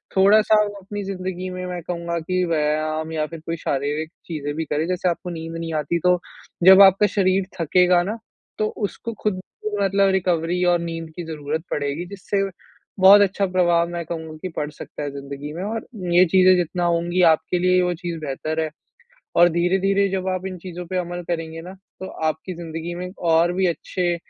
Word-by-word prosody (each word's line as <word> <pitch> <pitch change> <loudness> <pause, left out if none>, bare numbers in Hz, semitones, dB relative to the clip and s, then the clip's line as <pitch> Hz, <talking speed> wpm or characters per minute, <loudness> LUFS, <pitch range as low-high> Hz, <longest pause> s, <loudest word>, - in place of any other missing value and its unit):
थोड़ा-सा 210 +3 +5
वो 205 -1 -4
अपनी 205 +2 -6
ज़िंदगी 185 -1 -4
में 180 0 -5
मैं 180 -1 -5
कहूँगा 170 0 -3
कि 185 +3 -1
व्यायाम 155 0 -1
या 155 -1 -1
फ़िर 165 +1 -9
कोई 165 - -2
शारीरिक 150 +2 -2 0.2
चीज़ें 145 -3 -4
भी 160 +1 -2
करें। 150 +2 -1
जैसे 180 0 0
आपको 175 +1 -4
नींद 165 -1 -6
नहीं 165 -1 -4
आती 155 +3 0
तो 180 +1 +3 0.5
जब 190 +2 +9
आपका 195 +1 +7
शरीर 190 -1 +1
थकेगा 180 +2 +4
ना, 210 +5 -3 0.4
तो 215 - +1 0.2
उसको 230 - -7
ख़ुद 210 -3 0 0.4
मतलब 195 0 +3
रिकवरी 180 -1 0
और 175 - +2
नींद 165 -1 -5
की 175 - -5
ज़रूरत 155 0 -4
पड़ेगी। 145 +4 -2
जिससे 200 +1 -2 0.6
बहुत 195 +2 +9
अच्छा 200 0 +2
प्रभाव 175 -2 +2
मैं 170 -1 -4
कहूँगा 160 -1 -6
कि 185 - -4
पड़ 150 -1 -1
सकता 150 - -8
है 145 - -3
ज़िंदगी 140 +1 -7
में 175 +3 -5
और 220 +2 -4 0.3
ये 180 +2 +7
चीज़ें 185 0 +7
जितना 175 0 -1
होंगी 170 +1 +1
आपके 160 +3 -2
लिए 180 0 +3
वो 180 0 +1
चीज़ 170 -1 -5
बेहतर 155 +3 -3
है। 155 - -1 0.7
और 175 +1 +7
धीरे-धीरे 190 +4 +2
जब 190 0 -2
आप 185 0 -2
इन 185 - -6
चीज़ों 180 0 -7
पे 185 - -2
अमल 175 0 -3
करेंगे 165 -1 -3
ना 180 +2 -9 0.3
तो 190 - -4 0.2
आपकी 160 +4 -3
ज़िंदगी 165 0 -6
में 180 +1 -5 0.2
और 165 +2 +4
भी 190 +1 +1
अच्छे 175 +1 -1
175 Hz, 190 wpm, -22 LUFS, 160-185 Hz, 0.7 s, जब